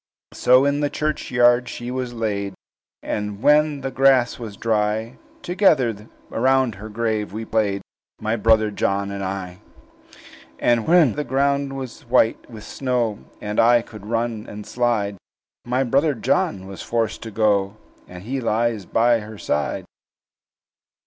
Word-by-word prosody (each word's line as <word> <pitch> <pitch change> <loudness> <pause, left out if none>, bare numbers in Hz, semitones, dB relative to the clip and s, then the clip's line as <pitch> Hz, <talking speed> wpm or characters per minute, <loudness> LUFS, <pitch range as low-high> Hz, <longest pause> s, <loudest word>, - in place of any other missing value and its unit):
"So 130 +2 +4
in 140 0 +1
the 145 -1 0
churchyard 125 -5 +2
she 120 +1 -6
was 130 -1 -3
laid; 100 -4 -3 0.5
And 105 0 -4
when 150 -1 +4
the 135 - -3
grass 130 -2 +3
was 110 -4 -7
dry, 110 +1 -1 0.2
Together 130 - +2 0.2
round 130 0 +2
her 105 +3 -9
grave 110 -2 -2
we 110 +1 -5
played, 100 -3 0 0.4
My 110 +1 -1
brother 110 -1 +3
John 100 0 -1
and 100 -1 -4
I. 95 -1 -5 1.0
"And 115 -2 +1
when 165 -7 +5
the 150 - -2
ground 140 +1 0
was 130 -3 -7
white 120 -2 +2
with 110 -3 -10
snow, 120 -6 -1 0.2
And 105 0 -2
I 120 0 +5
could 105 -3 -12
run 115 -1 -2
and 105 0 -8
slide, 110 -3 0 0.5
My 125 +2 +1
brother 140 +4 +2
John 100 -3 0
was 95 0 -8
forced 115 -2 -2
to 115 - -6
go, 105 -2 +1 0.3
And 90 0 -10
he 130 +5 -3
lies 115 -3 0
by 120 0 +3
her 110 0 -9
side." 75 -6 -2
115 Hz, 145 wpm, -22 LUFS, 105-130 Hz, 1.0 s, when